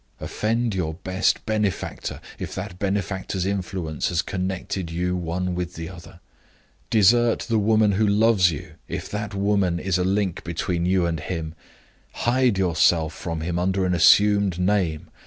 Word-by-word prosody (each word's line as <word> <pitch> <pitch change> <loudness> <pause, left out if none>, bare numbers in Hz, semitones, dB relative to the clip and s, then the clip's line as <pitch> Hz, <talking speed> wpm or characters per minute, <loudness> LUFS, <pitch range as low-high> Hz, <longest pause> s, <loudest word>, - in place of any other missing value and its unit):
Offend 115 +1 -1
your 80 -4 -2
best 95 +2 0
benefactor, 105 -4 -2 0.2
if - - -5
that 90 - -6
benefactor's 95 -2 -2
influence 95 -5 -2
has 85 0 0
connected 95 -1 -3
you 90 +2 -1
one 90 +1 -2
with 90 0 -4
the 80 0 -6
other. 85 -1 -12 0.7
Desert 115 +2 +4
the 115 -3 0
woman 110 0 +3
who 105 +2 +2
loves 105 -3 +4
you, 75 -4 -6 0.2
if - - -5
that 105 0 -4
woman 100 -3 +1
is 90 0 0
a - - +1
link 95 -1 0
between 85 +1 -2
you 90 -1 +2
and 85 -2 -1
him. 80 -1 -4 0.6
Hide 125 -3 +1
yourself 85 -3 +2
from 85 -5 -5
him 85 +1 -2
under 95 +1 +1
an 90 - +1
assumed 100 +2 +5
name. 90 -4 0
95 Hz, 155 wpm, -23 LUFS, 85-100 Hz, 0.7 s, assumed